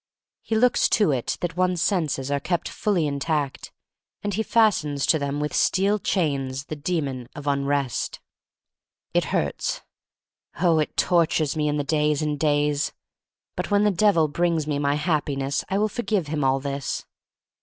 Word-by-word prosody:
He 225 - -2
looks 245 +2 +3
to 210 -9 +3
it 125 -4 -1
that 175 0 -2
one's 180 -1 +1
senses 155 -8 0
are 140 - +1
kept 175 +3 -2
fully 190 -7 0
intact, 145 -1 -2 0.5
and 205 0 -2
he 215 - 0
fastens 190 -12 +2
to 160 - +3
them 140 0 -2
with 150 0 -2
steel 200 +3 +2
chains 140 -8 -1
the 155 - -5
Demon 145 -6 -3
of 145 -2 -8
Unrest. 140 -2 -1 0.9
It - - +2
hurts - - -1 0.4
— - - -24
oh, 170 -3 +3
it 155 - -2
tortures 165 -4 +2
me 150 -1 0
in 150 0 0
the 145 - 0
days 150 0 +1
and 150 -1 -2
days! 145 -1 +1 0.6
But - - -3
when 205 0 +3
the 210 - +4
Devil 185 -4 +3
brings 165 0 0
me 145 -2 -1
my 145 0 +1
Happiness 145 -3 -1
I 195 - 0
will 210 +1 +2
forgive 215 -5 -1
him 150 -2 -1
all 135 0 +2
this. 140 0 -4
150 Hz, 165 wpm, -24 LUFS, 140-180 Hz, 0.9 s, the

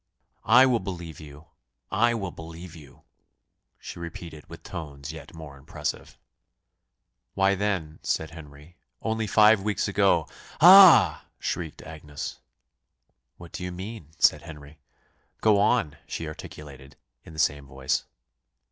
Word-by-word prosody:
"I 130 - +8
will 125 -3 +2
believe 85 -5 -7
you 75 0 -13 0.5
I 120 +3 +2
will 95 -5 -4
believe 85 +1 -10
you," 75 -5 -16 0.7
she - - -10
repeated 85 -2 -9
with - - -12
tones 70 -2 -8
yet 80 +1 -12
more 75 -4 -10
impressive. 75 +1 -6 1.2
"Why, 95 0 +3
then," 95 -6 -2
said 80 0 -2
Henry, 75 +1 -14 0.3
"only 110 -1 -1
five 105 0 +5
weeks 105 +1 -1
ago 100 -5 +2 0.2
" - - -20
"Ah!" 170 - +8
shrieked 80 -3 -5
Agnes. 75 -2 -8 1.0
"What 85 -2 -13
do - - -7
you 90 - -4
mean?" 95 -1 -8
said - - +4
Henry. 75 -2 -12 0.6
"Go 105 -2 +3
on," 105 -6 +1
she 80 - -5
articulated, 70 -3 -11 0.3
in 80 - -13
the - - -13
same 70 -2 0
voice. 65 0 -2
80 Hz, 130 wpm, -26 LUFS, 75-100 Hz, 1.2 s, I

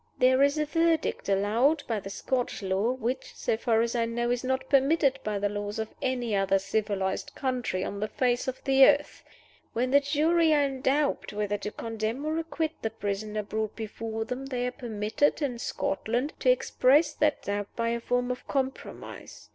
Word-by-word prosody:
"There 260 +1 +4
is 280 +2 +4
a 305 - +1
verdict 330 -5 +1
allowed 230 +10 +2
by 225 -3 -1
the 195 - -8
Scotch 245 +1 -2
law, 195 +5 +1
which 260 +1 -4
(so - - 0
far 225 0 +2
as 235 - -1
I 230 -1 +2
know) 240 +1 -1
is 245 0 -1
not 260 0 -1
permitted 275 0 +3
by 210 -1 -1
the 205 +1 +1
laws 205 0 -4
of 220 0 -4
any 245 -4 -1
other 195 0 +3
civilized 200 +5 -2
country 250 -8 -1
on 200 - -4
the 215 - -1
face 245 +3 0
of 260 - -4
the 270 -1 +5
earth. 290 +1 +3 0.5
When 250 +2 0
the 280 - +7
jury 310 +3 +3
are 290 - +4
in 270 -2 -2
doubt 280 -2 +1
whether 205 0 -1
to 210 - -4
condemn 225 +5 -4
or 315 +1 0
acquit 325 -1 -2
the 225 - -1
prisoner 210 0 -3
brought 215 +1 -3
before 225 0 -4
them, 255 +3 -5
they 250 -2 -2
are 250 - -1
permitted, 220 +3 0
in 260 -6 -2
Scotland, 280 0 -2
to - - +2
express 300 - +3
that 300 -1 +1
doubt 205 0 -2
by 230 0 0
a 235 0 -1
form 245 +1 0
of 250 - -6
compromise. 265 -1 -5
245 Hz, 190 wpm, -28 LUFS, 215-280 Hz, 0.5 s, the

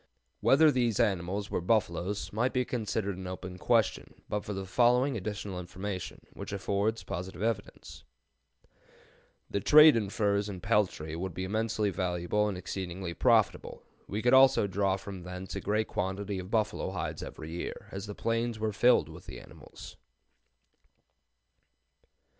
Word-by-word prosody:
Whether 155 +3 +5
these 120 -5 +1
animals 95 +1 0
were - - -1
buffaloes 100 0 0
might 120 +4 0
be 125 -1 +1
considered 105 -5 -2
an 95 -1 -6
open 90 0 -7
question 115 -2 0
but 105 0 -2
for - - -6
the 95 -1 -4
following 125 +6 +3
additional 100 -2 -4
information, 90 +1 -6
which - - -7
affords 100 +3 -1
positive 90 0 -5
evidence: 110 -3 -4 1.4
"The 100 - -2
trade 150 +6 +8
in 105 -4 0
furs 100 0 0
and 95 -3 -6
peltry 95 -8 0
would 90 +1 -4
be 95 - -3
immensely 110 +1 0
valuable 90 +3 0
and 100 -3 -3
exceedingly 90 -1 -5
profitable. - - +2 0.2
We 105 +2 -3
could 125 - +4
also 130 -4 +6
draw 95 0 0
from 95 -1 -8
thence 90 +1 -7
a - - -3
great 105 +1 0
quantity 95 +2 -3
of 90 0 -7
buffalo 110 -1 0
hides - - -4
every 80 +1 -8
year, 85 - -6
as 95 +2 -6
the 105 - -6
plains 115 0 -1
are 110 -1 -2
filled 120 +4 +4
with - - -12
the - - -8
animals." - - -13
100 Hz, 150 wpm, -30 LUFS, 95-110 Hz, 1.4 s, trade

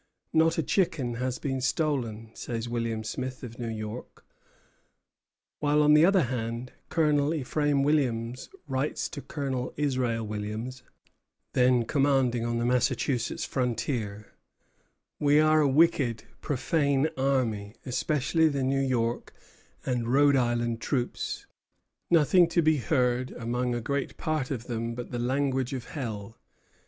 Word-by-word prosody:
"Not 165 +1 +4
a 165 - +1
chicken 140 -7 0
has 125 0 -2
been 135 -2 -2
stolen," 125 -6 -1
says 115 0 -4
William 115 -2 -2
Smith, 130 +3 -5
of 120 -1 -8
New 120 -1 -3
York; 110 +2 -7 1.3
while, 150 0 +3
on 150 0 +6
the 150 +2 +7
other 190 -2 +4
hand, 120 0 -3 0.2
Colonel 150 -1 +2
Ephraim 145 0 +1
Williams 125 -5 0 0.2
writes 135 +2 -1
to 145 - -7
Colonel 135 -4 -4
Israel 130 -6 0
Williams, 110 +4 -5 0.7
then 125 -2 +4
commanding 135 -4 +2
on 120 0 -1
the 120 - 0
Massachusetts 125 0 0
frontier: 115 -4 -2 0.9
"We 145 0 +4
are 155 0 +5
a 145 - +4
wicked, 135 -6 +3 0.2
profane 140 0 +1
army, 120 -6 0
especially 150 +4 +1
the 140 -2 -1
New 135 +1 +1
York 120 -3 -1 0.5
and 120 -3 -1
Rhode 140 +3 +4
Island 120 -2 0
troops. 125 -2 -2 0.6
Nothing 170 +2 +5
to 170 0 +1
be 155 0 +4
heard 125 0 +1
among 120 +1 -2
a 120 - -2
great 140 +3 -2
part 155 -5 -1
of 120 -4 -4
them 115 -1 -3
but 125 0 -7
the 120 - -3
language 130 +1 0
of 130 -2 -5
Hell. 115 -6 -6
130 Hz, 135 wpm, -28 LUFS, 120-145 Hz, 1.3 s, the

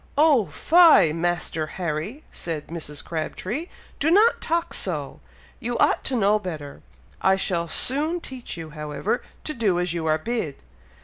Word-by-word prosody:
"Oh 290 -8 +5
fie, 325 - +6
Master 165 -2 -1
Harry!" 180 - -3
said 160 -4 -5
Mrs. 155 -3 -6
Crabtree. 185 - -3 0.3
"Do 300 - +2
not 420 +7 +5
talk 335 +1 -1
so! - - -2 0.4
You 240 -1 -2
ought - - +3
to 265 - 0
know 210 -1 +3
better! 155 -8 -7 0.4
I 190 0 +4
shall 175 -3 -1
soon 295 - +2
teach 255 - -7
you, 160 -2 -7
however, 150 - -2 0.2
to 305 - -3
do 205 -8 +1
as 180 -1 -1
you 165 -2 -2
are 155 0 +3
bid!" 165 - -3
190 Hz, 150 wpm, -24 LUFS, 160-265 Hz, 0.4 s, fie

